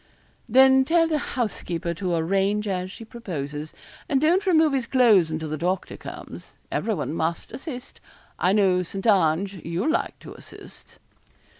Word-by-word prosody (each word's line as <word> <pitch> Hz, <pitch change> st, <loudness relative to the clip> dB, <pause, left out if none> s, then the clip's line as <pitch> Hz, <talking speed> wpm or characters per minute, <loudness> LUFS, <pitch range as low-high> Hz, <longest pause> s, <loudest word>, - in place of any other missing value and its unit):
'Then 265 Hz, +2 st, +6 dB
tell 330 Hz, +3 st, +3 dB
the 310 Hz, -2 st, 0 dB
housekeeper 185 Hz, -10 st, -3 dB
to 180 Hz, 0 st, -2 dB
arrange 195 Hz, +5 st, 0 dB
as 185 Hz, -1 st, -2 dB
she 225 Hz, +4 st, -10 dB
proposes, 155 Hz, -, -6 dB, 0.4 s
and 275 Hz, -3 st, +2 dB
don't 350 Hz, +7 st, +2 dB
remove 320 Hz, -4 st, +4 dB
his 260 Hz, -3 st, -1 dB
clothes 225 Hz, -11 st, +4 dB
until 160 Hz, 0 st, -4 dB
the 155 Hz, +1 st, -3 dB
doctor 180 Hz, +3 st, -2 dB
comes. -, -, -10 dB, 0.2 s
Everyone 200 Hz, -9 st, -2 dB
must 165 Hz, +1 st, -2 dB
assist. 255 Hz, 0 st, -8 dB, 0.4 s
I 180 Hz, -, +3 dB
know, 190 Hz, -3 st, +3 dB
St. 195 Hz, +3 st, -6 dB
Ange, 190 Hz, -2 st, +2 dB
you'll 175 Hz, -, -1 dB
like -, -, -1 dB
to -, -, -10 dB
assist.' -, -, -13 dB
195 Hz, 150 wpm, -24 LUFS, 170-260 Hz, 0.4 s, Then